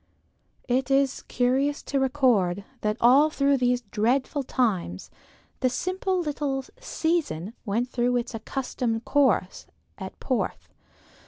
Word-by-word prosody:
It 255 +2 0
is 275 0 +2
curious 265 +4 +1
to 275 - -1
record, 240 -9 +2 0.2
that 210 +1 0
all 270 +6 +6
through 280 -2 +2
these 250 -1 +1
dreadful 255 +6 +1
times 210 - -1 0.5
the 255 - +2
simple 370 +6 -1
little 285 -4 -2
"season" 320 - -1
went 230 +5 0
through 245 0 0
its 240 0 -3
accustomed 230 0 -3
course 260 -10 +1 0.3
at - - -8
Porth. - - -2
255 Hz, 115 wpm, -26 LUFS, 230-280 Hz, 0.5 s, all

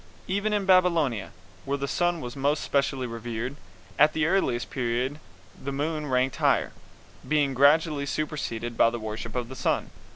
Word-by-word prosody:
Even 200 +3 0
in 205 -2 0
Babylonia, 170 - +3 0.3
where 140 +1 -1
the 140 0 -3
sun 175 +2 0
was 125 +2 -6
most 145 +2 0
specially 135 -2 0
revered, 115 +2 -4 0.4
at 150 +1 +6
the 155 -1 +1
earliest 160 -9 +1
period 125 +3 -1 0.4
the 140 - -3
moon 150 +2 -2
ranked 130 -1 +1
higher, - - +2 0.6
being 145 -3 +2
gradually 145 +2 +3
superseded 120 -6 -3
by 115 - +5
the 120 - -4
worship 110 +1 -6
of 125 -2 -2
the 130 - -9
sun. - - -1
140 Hz, 160 wpm, -27 LUFS, 120-155 Hz, 0.6 s, at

